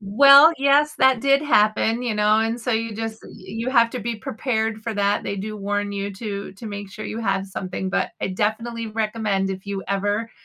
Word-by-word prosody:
Well, 275 +10 +7
yes, 285 +2 +3
that 265 -2 +4
did 275 +2 +3
happen, 220 -2 +2
you 235 -3 -2
know, 210 +1 +3
and 225 +2 -2
so 250 - -3
you 225 0 -2
just 225 0 -5
uh, - - -12
you 230 +3 -6
have 235 -3 +4
to 250 - -5
be 230 +1 -3
prepared 220 0 -3
for 225 -1 -4
that, 205 0 +1
they 200 - -4
do 215 +2 -5
warn 205 0 -2
you 200 0 -4
to 200 -1 -6
to 195 +4 -11
make 205 -1 -7
sure 215 +2 -8
you 220 - -5
have 195 -3 -1
something, 190 0 -5
but - - -1
I - - -1
definitely 225 +4 -2
recommend 215 -3 -1
if 190 +1 -7
you 200 -1 -4
ever 205 +3 -1
215 Hz, 215 wpm, -22 LUFS, 200-230 Hz, -, Well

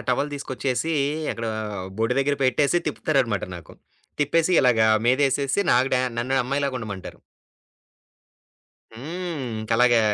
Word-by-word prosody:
Towel 140 +4 0
తీసుకొచ్చేసి 135 +2 -2 0.4
అక్కడా 115 -1 -4 0.5
బొడ్డు 115 +2 +1
దగ్గర 140 +1 0
పెట్టేసి 140 +6 +2
తిప్పుతారన్నమాట 135 -8 0
నాకు 85 - -13 0.5
తిప్పేసి 165 +4 +2
ఇలాగ 125 -4 +3 0.3
మీదేసేసి 140 +5 +2
నాకు 125 +2 +3
డా 125 - +2 0.2
నన్ను 130 +3 -1
అమ్మాయిలాగా 140 +1 -1
ఉండమంటారు. 100 -5 -7 1.7
హ్మ్. 160 +5 -5 0.2
ఇంకలగా 115 +2 +3
130 Hz, 105 wpm, -24 LUFS, 120-145 Hz, 1.7 s, ఇలాగ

